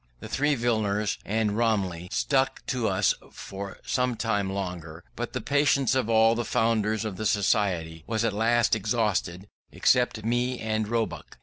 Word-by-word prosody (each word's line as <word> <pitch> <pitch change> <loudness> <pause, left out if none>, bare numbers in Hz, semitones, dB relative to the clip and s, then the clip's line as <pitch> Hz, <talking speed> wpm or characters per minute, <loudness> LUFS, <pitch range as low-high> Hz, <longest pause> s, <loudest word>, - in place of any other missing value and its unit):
The - - -8
three 145 +1 +1
Villiers 110 -4 0
and 105 0 0
Romilly 100 -7 0
stuck 135 -1 0
to 125 -4 -1
us 95 +1 +2 0.2
for 100 0 -8
some 125 -1 0
time 105 -4 -1
longer, 90 -4 -5
but 120 +1 -5
the 125 - -2
patience 140 0 +2
of 130 -4 0
all 110 0 +5
the 120 +1 -1
founders 110 -2 0
of 100 -4 -4
the 110 - -4
Society 90 -6 0
was 115 0 0
at 110 - 0
last 115 +2 +2
exhausted, 105 -4 -1 0.2
except 120 -3 +2
me 120 +2 0
and 110 -1 -1
Roebuck. 110 -8 -3
110 Hz, 160 wpm, -26 LUFS, 100-120 Hz, 0.2 s, all